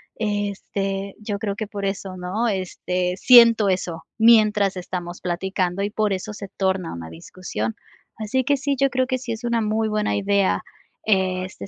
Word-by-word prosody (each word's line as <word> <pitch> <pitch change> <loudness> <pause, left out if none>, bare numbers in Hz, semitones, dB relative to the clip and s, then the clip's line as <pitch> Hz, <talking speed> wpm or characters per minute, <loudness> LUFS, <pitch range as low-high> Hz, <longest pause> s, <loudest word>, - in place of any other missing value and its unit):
este, 200 -2 -3
yo 210 -1 -4
creo 205 -2 -2
que 215 +1 -4
por 200 -1 -5
eso, 195 -1 -4
¿no? 195 +6 -1
Este, 180 -2 -2
siento 230 -1 +7
eso, 175 -3 -2
mientras 215 -3 +5
estamos 175 -1 -6
platicando 185 +1 -1
y 205 - -1
por 210 -1 0
eso 195 +3 -3
se 200 -2 -8
torna 190 -3 0
una 85 -1 -7
discusión. 110 - -5 0.4
Así 225 +4 -1
que 285 +1 +2
sí, 280 +1 -1
yo 275 +1 +3
creo 255 0 0
que 255 0 -1
sí 240 -2 -5
es 225 +2 -5
una 235 -1 +1
muy 220 +1 0
buena 210 0 0
idea, 200 -1 +1 0.5
este, 185 - 0
200 Hz, 170 wpm, -23 LUFS, 185-220 Hz, 0.5 s, siento